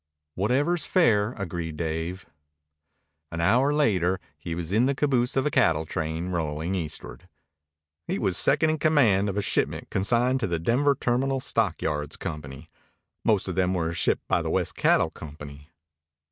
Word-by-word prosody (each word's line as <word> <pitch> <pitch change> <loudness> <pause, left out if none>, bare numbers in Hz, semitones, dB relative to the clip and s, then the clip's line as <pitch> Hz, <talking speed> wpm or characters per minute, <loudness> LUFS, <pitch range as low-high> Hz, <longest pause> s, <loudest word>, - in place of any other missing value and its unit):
"Whatever's 140 - +1
fair," 115 - +3
agreed 85 -7 -5
Dave. 80 +3 -3 1.1
An 85 - -4
hour 125 +11 +3
later 95 - +2 0.2
he 80 +2 -6
was 85 0 -5
in 115 +5 +3
the 140 - +1
caboose 130 -3 +1
of 135 - +2
a 150 - +1
cattle 80 -7 +2
train 80 +3 -3
rolling 80 0 -2
eastward. 80 -5 -5 0.8
He - - -1
was 95 -2 0
second 155 - +3
in 155 - -2
command 115 -11 +3
of 100 - -4
a 105 - 0
shipment - - -1
consigned 120 +6 +1
to 115 - -1
the 85 -2 -1
Denver 130 - +2
Terminal 135 +2 0
Stockyards 80 - -1
Company. 75 -4 -7 0.6
Most 105 -3 +2
of 95 - -2
them 90 +1 +1
were 85 -1 -1
shipped - - -1
by - - +2
the - - -3
West - - -1
Cattle - - +2
Company. 75 -1 -10
95 Hz, 160 wpm, -26 LUFS, 80-125 Hz, 1.1 s, fair